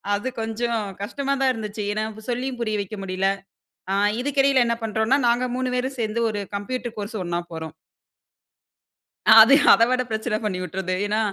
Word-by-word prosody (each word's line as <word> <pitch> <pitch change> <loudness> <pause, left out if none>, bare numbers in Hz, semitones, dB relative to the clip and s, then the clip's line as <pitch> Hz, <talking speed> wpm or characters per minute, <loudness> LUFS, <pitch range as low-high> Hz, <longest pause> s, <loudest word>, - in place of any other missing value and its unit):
அது 230 +6 -3
கொஞ்சம் 225 +1 -2 0.2
கஷ்டமா 275 +6 -2
தான் 265 -1 +4
இருந்துச்சு. 215 -2 -5
ஏன்னா, 215 +1 -1
ப் 220 - -12
சொல்லியும் 250 +1 -3
புரிய 215 -2 -1
வைக்க 200 +2 -6
முடியல. 190 0 0 0.6
ஆ - - +1 0.3
இதுக்கு 280 +1 0
இடையில 270 -2 +4
என்ன 235 0 0
பண்றோன்னா, 220 +4 +1
நாங்க 240 +1 +2
மூணு 255 -1 -2
பேரும் 260 +1 -3
சேர்ந்து 220 +1 -1
ஒரு 205 -1 -3
கம்ப்யூட்டர் 240 +3 -5
கோர்ஸ் 210 +2 -5
ஒண்ணா 175 0 -2
போறோம். 160 -1 -7 1.7
அது 230 +5 +9 0.2
அதை 230 - +5
விட 255 0 +2
பிரச்சனை 220 0 -1
பண்ணி 195 -4 -2
வுட்றுது. 185 +1 -3
ஏன்னா, 210 +1 0
220 Hz, 170 wpm, -23 LUFS, 205-250 Hz, 1.7 s, அது